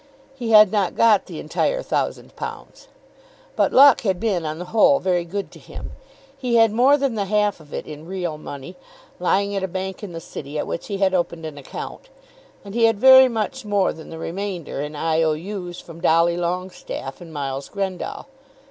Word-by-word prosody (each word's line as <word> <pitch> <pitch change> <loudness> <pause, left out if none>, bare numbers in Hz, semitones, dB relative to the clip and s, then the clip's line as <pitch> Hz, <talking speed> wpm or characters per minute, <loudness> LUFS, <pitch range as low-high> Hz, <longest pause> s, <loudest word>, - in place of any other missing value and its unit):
He 245 -4 -5
had 215 -3 +7
not 200 -5 0
got 220 -4 +4
the - - -7
entire - - -1
thousand - - -3
pounds. - - -8 0.7
But - - +2
luck 275 -1 +7
had 190 -4 0
been 190 -8 -1
on 155 +1 -4
the 180 - -6
whole 275 +5 +5
very 180 -2 +1
good 200 +3 -5
to - - -14
him. - - -9 0.4
He 250 -3 -1
had 225 -2 +5
more 255 +6 +5
than 275 -3 0
the 205 -3 -1
half 210 -1 +1
of 150 -2 -17
it - - -5
in 150 +1 -10
real 175 -4 -4
money, 145 +5 -9 0.4
lying 200 +3 +1
at 195 - -1
a 190 - -1
bank 190 +1 -5
in 205 -4 -7
the 165 - -6
city 150 -2 -7
at - - -1
which - - -5
he 200 - -3
had 195 -1 +2
opened 170 -2 -1
an 150 -2 -7
account. 135 - -8 0.6
And 200 - -8
he 230 0 +3
had 225 -2 +3
very 260 +1 +9
much 230 +3 -3
more 205 -2 +1
than 160 - -12
the 165 - -8
remainder 175 -3 -4
in 150 +1 -5
I. 160 +1 +1
O. 160 -1 +3
U.'s 180 +1 -6
from 165 0 -12
Dolly 170 +1 +3
Longestaffe 175 -4 -4
and 170 -2 -10
Miles 140 -2 -4
Grendall. 195 -3 -4
185 Hz, 200 wpm, -22 LUFS, 165-215 Hz, 0.7 s, very